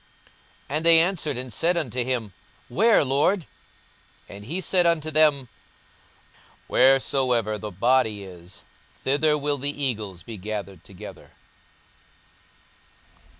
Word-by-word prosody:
42:017:037 150 - -1
And 160 - -1
they 165 -1 +8
answered 165 -6 0
and 125 -2 -5
said 170 +1 +1
unto 125 -6 -1
him, 120 -5 -3 0.4
Where, 210 - +3
Lord? 150 +7 +1 0.8
And 100 +1 -11
he 165 +10 -4
said 180 -1 +2
unto 155 -2 0
them, 150 -4 +3 1.2
Wheresoever 130 -5 +2
the 105 - -6
body 110 +1 +1
is, 90 -1 -11 0.3
thither 150 +3 +1
will 145 -1 -2
the 145 +1 -4
eagles 105 -9 -3
be 115 +1 -9
gathered 100 -3 -6
together. 100 +2 -12
130 Hz, 115 wpm, -24 LUFS, 105-155 Hz, 1.2 s, they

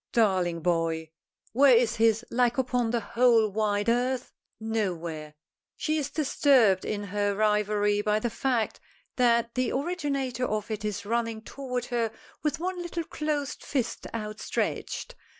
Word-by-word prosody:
Darling 185 -7 +2
boy! 165 -1 0 0.4
Where 265 +1 +6
is 235 -1 +1
his 225 +1 +3
like 245 0 +2
upon 250 -2 +1
the 235 0 0
whole 230 -1 +3
wide 205 0 0
earth? 245 +2 0 0.3
Nowhere. 170 -9 -3 0.4
She 310 0 0
is 290 -1 -2
disturbed 265 -9 +3
in 205 -1 -2
her 205 0 -1
reverie 210 0 +2
by 210 0 +1
the 230 +2 -2
fact 245 -3 -1 0.4
that 235 -2 +3
the 255 -1 0
originator 275 -5 -1
of 215 +1 -3
it 215 -1 -3
is 205 -1 -3
running 230 0 -1
toward 250 -1 -4
her 230 -2 +1 0.3
with 300 -1 -1
one 360 +1 -3
little 345 -1 -3
closed 300 -3 -3
fist 250 -4 -2
outstretched. 215 -1 -3
230 Hz, 140 wpm, -27 LUFS, 210-255 Hz, 0.4 s, Where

